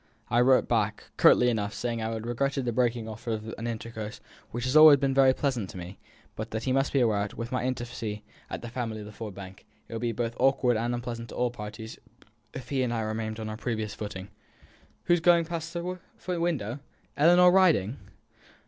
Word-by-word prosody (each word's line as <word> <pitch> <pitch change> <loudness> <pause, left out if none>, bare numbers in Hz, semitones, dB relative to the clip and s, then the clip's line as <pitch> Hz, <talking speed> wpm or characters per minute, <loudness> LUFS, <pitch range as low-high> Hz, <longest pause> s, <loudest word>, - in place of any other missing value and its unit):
I 120 0 +4
wrote 130 +1 +4
back, 105 -3 -1
curtly 125 - +6
enough, 110 -3 -1
saying 120 -1 -2
that 110 0 -2
I - - -3
regretted 125 +4 -2
the 120 - 0
breaking 120 -1 0
off 110 +1 -9
of 110 0 -3
an 115 - -3
intercourse 110 -2 -6 0.3
which 120 +1 -4
had 130 +3 -1
always 155 -2 +10
been 135 0 0
very 135 -1 +6
pleasant 130 -7 -1
to - - -9
me, 90 +2 -8 0.4
but 110 +1 -5
that 110 0 -4
he 130 - 0
must 135 +1 +1
be 135 - +2
aware 105 -4 +2
that, - - -14
with 115 +1 -5
my 125 -1 -1
intimacy 120 -4 -4 0.3
with - - -5
the 120 - -5
family 115 -3 -4
at 105 - -11
Ford 105 -2 -7
Bank, 95 -1 -10 0.2
it - - -10
would 115 - -4
be 120 -1 0
both 115 +1 -2
awkward 130 -2 +3
and 120 +2 -1
unpleasant 120 -1 -5
to - - -9
all 125 -1 0
parties 110 0 -8 0.5
if 125 -2 -8
he 135 -2 0
and 125 -2 0
I 115 -1 -1
remained 110 0 -3
on 110 - -4
our 110 0 -5
previous 110 -3 -3
footing. 100 -2 -7 0.7
Who - - +3
is 175 - +3
that - - -16
going 170 -1 +5
past 165 -1 -5
the 175 +1 -3 0.5
window? 145 -8 -1 0.4
Ellinor 175 +4 +6
riding?" 160 - +3
120 Hz, 215 wpm, -28 LUFS, 110-130 Hz, 0.7 s, always